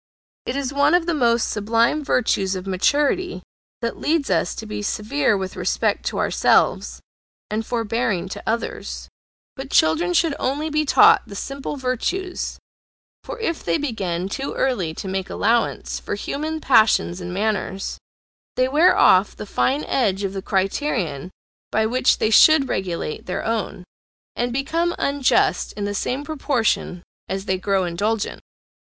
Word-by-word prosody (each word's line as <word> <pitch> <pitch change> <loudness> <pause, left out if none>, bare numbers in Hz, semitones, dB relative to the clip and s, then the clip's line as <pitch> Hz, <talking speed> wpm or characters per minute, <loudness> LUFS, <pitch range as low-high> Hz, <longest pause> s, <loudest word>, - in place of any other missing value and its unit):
It 250 - -2
is 275 -1 -2
one 285 +3 +4
of 355 -2 +2
the 340 - 0
most 235 -5 +2
sublime 230 +8 +1
virtues 200 -8 +1
of 185 0 -6
maturity 290 - 0 0.4
that 230 - -3
leads 310 -2 0
us - - +1
to 220 - -7
be 210 -1 -5
severe 215 +3 0
with 190 -1 -5
respect - - -1
to - - -2
ourselves, - - +2 0.5
and 215 +1 -1
forbearing 225 -5 -1
to - - -6
others; 230 +1 -3 0.5
but 270 0 -7
children 170 - +2
should 330 -3 +3
only 295 +4 -1
be 305 0 +1
taught - - +5
the 200 - -9
simple 275 +6 -5
virtues, 280 +9 -2 0.7
for - - -7
if 335 -7 -2
they 170 -1 +1
begin 190 -10 -3
too 270 +7 -4
early 190 -12 -1
to 195 - -6
make 190 0 -3
allowance 230 +2 0
for - - -4
human 310 +9 -4
passions 215 - +3
and 175 0 -5
manners, 195 0 -2 0.6
they 255 - +2
wear 305 +7 +4
off 185 +3 +5
the - - -7
fine 270 +7 0
edge 205 -7 0
of 195 -1 -2
the 195 - -4
criterion 190 - -1 0.4
by 220 0 +2
which 250 +3 +2
they 220 - 0
should 310 +3 +6
regulate 170 -4 -3
their 180 - -3
own, 225 -5 -2 0.5
and 240 0 -1
become 330 +7 -1
unjust 280 -2 +1
in 205 - -4
the 205 - -2
same 255 +7 -2
proportion 265 - -1 0.3
as 190 +1 -3
they 185 -2 -1
grow 195 0 +1
indulgent. 205 +5 -2
225 Hz, 155 wpm, -22 LUFS, 195-280 Hz, 0.7 s, should